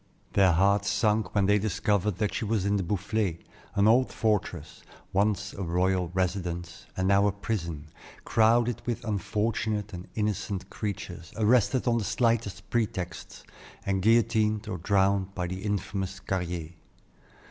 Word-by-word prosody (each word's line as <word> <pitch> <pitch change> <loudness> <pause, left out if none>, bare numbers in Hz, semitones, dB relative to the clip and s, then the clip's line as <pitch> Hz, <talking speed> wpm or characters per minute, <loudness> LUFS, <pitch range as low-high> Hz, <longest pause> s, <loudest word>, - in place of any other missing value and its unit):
Their 95 -3 +5
hearts 100 +3 +3
sunk 105 +2 +1
when 100 -1 +3
they 105 +1 +4
discovered 105 -1 0
that 105 +2 -1
she - - -2
was 105 -2 0
in 100 0 +2
the - - 0
Boufflay, 95 0 -1 0.4
an 100 +1 +4
old 125 +4 +4
fortress, 95 -8 -1 0.3
once 100 0 +1
a 100 - -7
royal 90 0 +1
residence, 85 -2 -2
and 95 0 +1
now 100 +1 +4
a - - +2
prison, 85 -7 -4 0.4
crowded 115 +1 +3
with 120 0 -2
unfortunate 105 0 -1
and 90 0 -7
innocent 105 -2 -2
creatures, 90 -5 -5
arrested 120 +3 +3
on 115 -1 +3
the - - -2
slightest 110 -5 0
pretexts, 90 -6 -3 0.4
and 95 -1 0
guillotined 110 0 +3
or 90 -5 -4
drowned 100 +1 +1
by 90 - -2
the 90 +2 -5
infamous 95 -2 -2
Carrier. 90 -4 -3
100 Hz, 145 wpm, -28 LUFS, 95-110 Hz, 0.4 s, Their